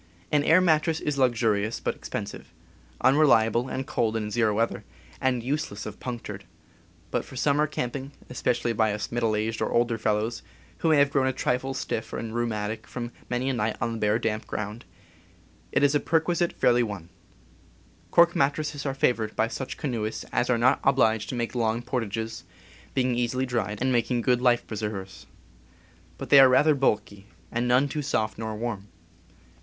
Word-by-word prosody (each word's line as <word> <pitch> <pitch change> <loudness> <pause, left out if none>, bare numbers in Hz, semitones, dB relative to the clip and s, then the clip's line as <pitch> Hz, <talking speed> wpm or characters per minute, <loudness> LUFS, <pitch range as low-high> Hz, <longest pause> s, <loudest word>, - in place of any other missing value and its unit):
An 150 -1 +3
air 165 +5 +5
mattress 160 -2 +2
is 145 -2 -2
luxurious, 115 -4 +1
but - - -1
expensive, - - -7 0.5
unreliable 130 -4 +4
and 130 - -3
cold 115 -3 0
in 105 -1 -2
zero 110 -2 +2
weather, 115 -1 -1 0.4
and 125 -3 +1
useless 130 -7 -3
if 105 -1 -8
punctured; 115 -5 -6 0.7
but - - 0
for - - -12
summer 145 +3 +2
camping, 135 -1 -4 0.2
especially 120 -1 -1
by 110 -1 +2
us 105 - -5
middle 115 -2 +1
aged 110 +1 -2
or - - 0
older 120 -1 +1
fellows, 110 +2 -1 0.4
who 165 - +1
may 155 - +5
have 140 0 +4
grown 135 -2 +2
a - - +2
trifle 130 +1 -1
stiff 115 -3 -4
and 110 -1 -4
rheumatic 110 -2 -2
from 120 -1 -5 0.2
many 125 +1 -1
a 135 - +1
night 110 -2 -1
on 115 0 -1
the - - -4
bare, 105 0 +2
damp 110 -2 -2
ground, 105 +1 -5 0.9
it - - +2
is 145 0 +4
a 145 - +3
perquisite 170 +2 +1
fairly 120 0 +3
won. 100 -7 -4 1.0
Cork 170 0 +5
mattresses 145 +1 0
are 135 - -2
favored 115 -5 0
by 110 - +2
such 130 +3 -5
canoe 120 -7 -2
ists 110 - -5
as 120 - 0
are 125 - +3
not 125 +4 +3
obliged 115 -5 +2
to - - -3
make 120 -1 -2
long 115 -1 0
portages, 115 -2 -3 0.5
being 130 -1 +2
easily 125 +2 0
dried, 115 -4 -2
and 130 +1 +1
making 120 0 +1
good 125 -1 +2
life 120 -1 +3
preservers. 105 -3 -6 0.9
But - - -8
they 140 - +9
are 135 -1 +9
rather 150 +5 +5
bulky, 105 -7 -1 0.2
and 120 +1 -1
none 125 +3 +4
too 150 +1 -3
soft 110 -7 -1
nor 110 -1 -4
warm. 105 -3 -4
120 Hz, 180 wpm, -26 LUFS, 110-135 Hz, 1.0 s, they